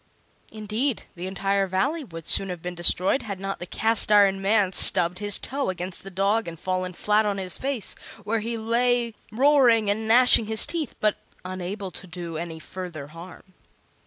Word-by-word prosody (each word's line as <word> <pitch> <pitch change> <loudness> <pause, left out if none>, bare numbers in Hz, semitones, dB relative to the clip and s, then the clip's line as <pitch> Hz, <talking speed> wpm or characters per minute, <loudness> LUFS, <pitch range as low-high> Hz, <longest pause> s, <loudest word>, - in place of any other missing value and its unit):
Indeed, 220 +4 -2
the 180 +1 -6
entire 195 +1 0
Valley 200 - -1
would 165 - -10
soon 195 - +3
have 180 -2 -6
been 180 0 -4
destroyed 180 +7 +2
had 200 -4 -6
not 195 0 -4
the 175 - -7
Cast 220 +2 +1
iron 200 -2 +5
Man 200 -1 +2
stubbed 175 -1 +3
his 205 -1 +2
toe 275 -2 -3
against 180 0 -3
the 195 - -8
dog 200 +3 0
and 165 -1 -7
fallen 185 0 -2
flat 210 +4 +2
on 205 -2 -1
his 185 -2 -3
face, 265 -5 -2 0.3
where 220 +2 -1
he 230 +2 -4
lay 235 +1 +1 0.2
roaring 240 -4 +4
and 220 +2 -3
gnashing 235 -1 +5
his 220 0 +3
teeth, 325 -4 -4
but 215 -1 +1 0.3
unable 185 +2 -5
to 185 - -10
do 170 -2 -7
any 165 0 -5
further 160 -3 -8
harm. 175 +3 -13
200 Hz, 180 wpm, -24 LUFS, 180-225 Hz, 0.3 s, iron